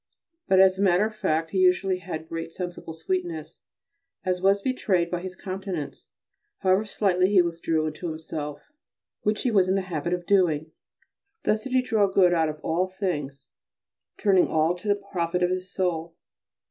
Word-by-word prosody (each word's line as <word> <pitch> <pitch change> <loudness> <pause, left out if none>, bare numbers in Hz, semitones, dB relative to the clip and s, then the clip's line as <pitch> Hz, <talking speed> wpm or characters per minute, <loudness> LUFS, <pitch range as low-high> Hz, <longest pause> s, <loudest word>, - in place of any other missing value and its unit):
But 190 - +4
as 190 0 +5
a - - +1
matter 190 +1 +4
of 220 0 -5
fact 160 -5 -1
he 190 - 0
usually 185 0 +3
had 160 -3 -6
great 165 0 -5
sensible 175 -2 -6
sweetness, 165 -1 -4 0.7
as 180 -1 0
was 195 +1 +3
betrayed 190 -9 0
by 175 -1 -2
his 185 0 -7
countenance, 185 -5 -6 0.5
however 190 +2 +3
slightly 190 -3 +1
he 195 -3 +5
withdrew 165 -2 -1
into 155 +3 -4
himself, 155 - -6 0.5
which 210 +1 0
he 250 - +1
was 190 -4 +3
in 190 - +3
the 195 - +1
habit 170 -2 -3
of 175 -1 -3
doing. 165 -6 +2 0.7
Thus 215 +1 0
did 265 - -5
he 255 -1 +3
draw 220 -5 +2
good 190 -2 +4
out 160 -2 +2
of 155 0 -6
all 175 +3 0
things, 150 -8 -4 0.7
turning 195 -4 +4
all 160 +2 +2
to 180 +4 -9
the 205 - +4
profit 180 -3 -2
of 180 - +2
his 185 0 -3
soul. 170 -4 -2
180 Hz, 175 wpm, -26 LUFS, 165-195 Hz, 0.7 s, as